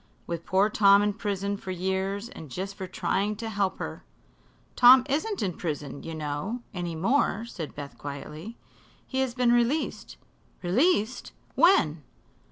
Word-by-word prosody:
"With 170 -1 -5
poor 190 +2 +4
Tom 200 -1 +5
in 205 0 +1
prison 200 -1 -2
for 190 - -9
years 190 +3 -2
and 160 - -10
just 190 +8 -5
for 190 -1 -6
trying 195 +3 -1
to 225 +2 -5
help 200 -2 0
her." - - -6 0.7
"Tom 255 +1 +8
isn't 360 +9 -1
in 185 -3 -1
prison, 145 -5 -5
you 165 - -6
know, 155 +11 -4
any 175 -3 -4
more," 225 - +1
said 170 -9 -7
Beth 145 -1 -8
quietly. 150 +9 -7 0.5
"He 265 - -3
has 265 -2 0
been 250 -2 +3
released." 240 +6 0 0.5
"Released! 235 - +1 0.2
When?" 170 - +4
200 Hz, 150 wpm, -27 LUFS, 170-235 Hz, 0.7 s, Tom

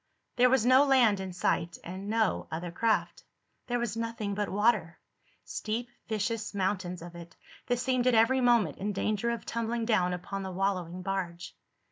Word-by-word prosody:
There 250 0 +5
was 255 -3 +3
no 260 +2 +7
land 250 -8 +4
in 190 -1 -5
sight, 175 -1 -1
and 190 +3 -6
no 220 -2 +1
other 170 +2 -4
craft. 220 +4 0 0.4
There 245 -1 0
was 235 -3 -2
nothing 230 -3 -3
but 205 0 -2
water—steep 215 +3 -2 0.2
vicious 220 0 -2
mountains 185 -3 -2
of 175 0 -9
it 170 -1 -11 0.3
that 245 -1 +1
seemed 255 0 +1
at 250 - +4
every 255 +4 +4
moment 235 - +3
in 205 +2 -2
danger 215 +3 0
of 235 -2 -3
tumbling 230 0 -2
down 185 -6 +2
upon 195 +2 -5
the 190 - -4
wallowing 185 -2 -2
barge. 180 -3 -4
210 Hz, 165 wpm, -29 LUFS, 185-235 Hz, 0.4 s, no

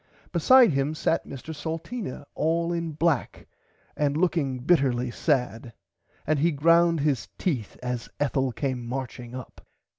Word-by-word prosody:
Beside 240 +7 +6
him 140 +2 0
sat 160 - 0
Mr 140 +4 -7
Salteena 165 - -5
all 170 +2 0
in 170 -2 -3
black 155 -2 0 0.5
and 145 0 0
looking 160 -7 +1
bitterly 125 -4 +2
sad 125 -5 -1 0.5
and 155 -2 +1
he 165 +4 +3
ground 165 +2 +4
his 135 -11 0
teeth 130 - -2
as 125 -1 -3
Ethel 135 -2 +1
came 125 0 -3
marching 125 0 -5
up. 130 -2 -9
145 Hz, 130 wpm, -26 LUFS, 125-165 Hz, 0.5 s, Beside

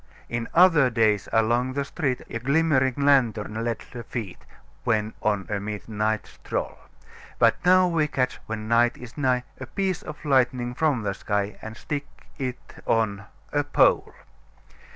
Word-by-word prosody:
"In 120 -1 -2
other 165 -6 +6
days, 110 -3 +2
along 120 +3 +2
the 140 0 -1
street, 140 -4 -2
A 115 - -4
glimmering 135 -1 +2
lantern 115 -6 +2
led 115 -2 -2
the 120 - -6
feet, 110 -5 -6 0.4
When 110 -2 0
on 105 -2 0
a 105 -1 -2
midnight 105 +1 -2
stroll; - - -5 0.6
But - - +3
now 185 0 +6
we 165 -3 +1
catch, 130 -3 -1
when 110 -1 -4
night 120 +1 +3
is 125 -1 -11
nigh, 130 -4 +1 0.2
A 130 - -7
piece 190 0 -1
of 150 - -9
lightning 125 -3 +2
from 145 -5 +1
the 100 -1 -1
sky 105 0 -2
And 110 0 -8
stick 145 +1 -4 0.3
it 130 -2 -6
on 100 -3 +1 0.3
a 145 0 +2
pole. 145 - +3
120 Hz, 150 wpm, -25 LUFS, 110-140 Hz, 0.6 s, other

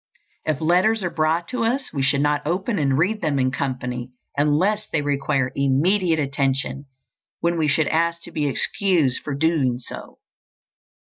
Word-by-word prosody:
If 155 -3 0
letters 185 +7 +3
are 175 - -1
brought 160 +2 0
to 250 -2 -2
us, 255 +4 -1
we 140 - -1
should 140 +1 +2
not 145 0 +1
open 190 +6 -1
and 135 -2 +2
read 205 +7 +1
them 150 -4 0
in 130 -1 +1
company 125 -2 -3 0.3
unless 180 +9 +1
they 150 -2 -1
require 140 -2 0
immediate 160 +6 +2
attention, 140 -1 -1 0.6
when 170 0 +1
we 160 -2 +1
should 150 +1 +2
ask 170 +1 0
to - - -9
be 150 -2 -1
excused 160 -2 +1
for 145 - -4
doing 140 -5 +1
so. 125 - -10
150 Hz, 160 wpm, -22 LUFS, 140-175 Hz, 0.6 s, letters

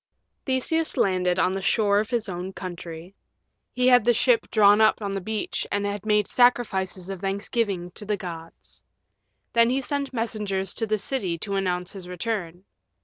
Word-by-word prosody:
Theseus 305 +5 0
landed 180 -2 +2
on 185 0 +2
the 195 - -3
shore 205 0 +2
of 215 - -2
his 235 -4 -1
own 185 +1 -5
country. 175 -1 -8 0.6
He 250 0 +1
had 245 -2 +6
the 240 +1 +3
ship 240 0 +2
drawn 210 0 +5
up 220 - +4
on 200 -2 -3
the 195 0 -3
beach 215 +3 -3
and 205 0 0
he 205 0 -2
made 210 -2 +2
sacrifices 195 -7 +1
of 190 -2 -7
thanksgiving 195 -2 -2
to 210 - -6
the 210 -1 0
gods. 165 -3 -9 0.7
Then 230 0 +5
he 260 +2 +1
sent 280 +1 -2
messengers 210 -5 -2
to 225 - -1
the 215 0 +1
city 195 -5 -1
to 200 +4 -4
announce 180 -2 -1
his 190 -3 -9
return. 180 -2 -4
200 Hz, 175 wpm, -25 LUFS, 185-225 Hz, 0.7 s, had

